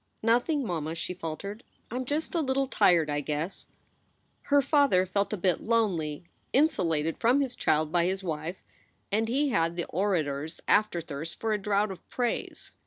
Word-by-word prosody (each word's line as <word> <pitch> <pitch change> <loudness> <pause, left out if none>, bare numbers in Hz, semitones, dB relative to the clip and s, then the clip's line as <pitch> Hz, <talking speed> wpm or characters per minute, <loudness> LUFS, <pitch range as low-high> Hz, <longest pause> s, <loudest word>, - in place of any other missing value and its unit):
"Nothing, 245 +5 +2
mamma," 160 -4 -3
she 175 - -3
faltered. 185 +6 -6 0.3
"I - - -4
m 255 - -3
just 295 +5 -2
a 335 - +1
little 270 -1 +1
tired, 175 - +3
I 145 -1 -1
guess." 150 +6 -3 0.8
Her 285 0 +6
father 280 -9 +3
felt 200 +2 -1
a 210 - -1
bit 180 -1 +1
lonely, 180 -11 0 0.3
insulated 165 - +2
from 245 +4 +4
his 265 -3 -1
child 155 0 +1
by 170 -1 +3
his 190 +2 -1
wife; 165 +1 -4 0.5
and 220 +2 +1
he 280 +5 +1
had 165 -7 +1
the 175 - -2
orator 160 -7 0
s 160 - -9
afterthirst 165 -6 0
for 225 -1 0
a 210 - 0
draught 205 0 +1
of 190 - -11
praise. 245 -2 -3
190 Hz, 175 wpm, -28 LUFS, 165-240 Hz, 0.8 s, Her